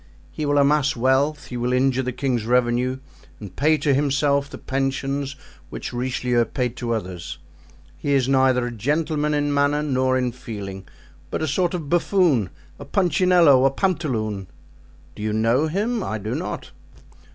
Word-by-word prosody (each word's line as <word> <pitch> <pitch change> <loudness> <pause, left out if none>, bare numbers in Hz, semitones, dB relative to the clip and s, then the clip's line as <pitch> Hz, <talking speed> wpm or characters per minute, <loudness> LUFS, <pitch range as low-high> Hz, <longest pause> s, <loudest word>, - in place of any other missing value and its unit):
He 150 - -3
will 145 0 +2
amass 145 0 +3
wealth, 135 +5 +1
he 125 - -5
will 120 +1 -1
injure 130 0 +2
the 125 -1 -2
king's 125 -2 -1
revenue 125 +1 +1 0.4
and 100 -4 -10
pay 155 +3 +3
to 145 -2 +1
himself 140 0 +1
the - - -8
pensions 135 +1 -2 0.3
which - - -6
Richelieu 125 -1 0
paid 125 -1 -3
to 115 -1 -1
others. 90 -5 -6 0.6
He 140 - -1
is 130 -2 +2
neither 130 -2 +3
a 120 - -4
gentleman 150 +5 0
in 145 0 0
manner 145 +1 +2
nor 130 -2 +1
in 125 -1 0
feeling, 100 -6 -8 0.4
but - - -3
a - - 0
sort 175 +5 0
of 160 -5 -5
buffoon, 170 - +2 0.3
a - - -7
punchinello, 170 -4 +4
a 135 - +5
pantaloon. 125 - -2 0.7
Do - - -9
you 105 0 -1
know 115 +7 +2
him? 215 +8 -1
I 110 - -3
do 105 +1 -4
not." - - -5
135 Hz, 165 wpm, -22 LUFS, 120-150 Hz, 0.7 s, a